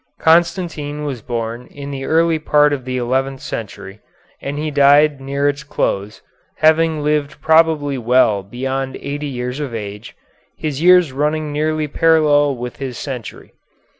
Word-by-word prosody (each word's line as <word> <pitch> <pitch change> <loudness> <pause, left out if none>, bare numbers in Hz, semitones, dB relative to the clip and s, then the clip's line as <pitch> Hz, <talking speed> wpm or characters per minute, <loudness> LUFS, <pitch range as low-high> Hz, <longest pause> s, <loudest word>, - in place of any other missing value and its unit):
Constantine 160 -3 +1
was 135 -5 -4
born 115 +1 -4
in 140 0 -9
the 135 -1 -5
early 165 0 +2
part 150 -1 +3
of 130 -3 -4
the 130 0 -3
eleventh 130 +2 -1
century, 100 -3 -7 0.4
and 145 +2 -4
died 145 0 +4
near 140 +1 -1
its 145 0 -1
close, 105 -6 -3 0.3
having 160 -1 +3
lived 150 0 -1
probably 155 -3 +2
well 120 -4 +3
beyond 130 +6 -4
eighty 145 +1 -4
years 125 0 -4
of 135 -6 -4
age, 105 0 -7 0.4
his 150 -2 -4
years 180 -3 +5
running 150 +2 -1
nearly 155 +1 -1
parallel 150 -2 +3
with 125 0 -6
his 130 -3 -5
century. 130 -6 -7
145 Hz, 140 wpm, -18 LUFS, 130-155 Hz, 0.4 s, years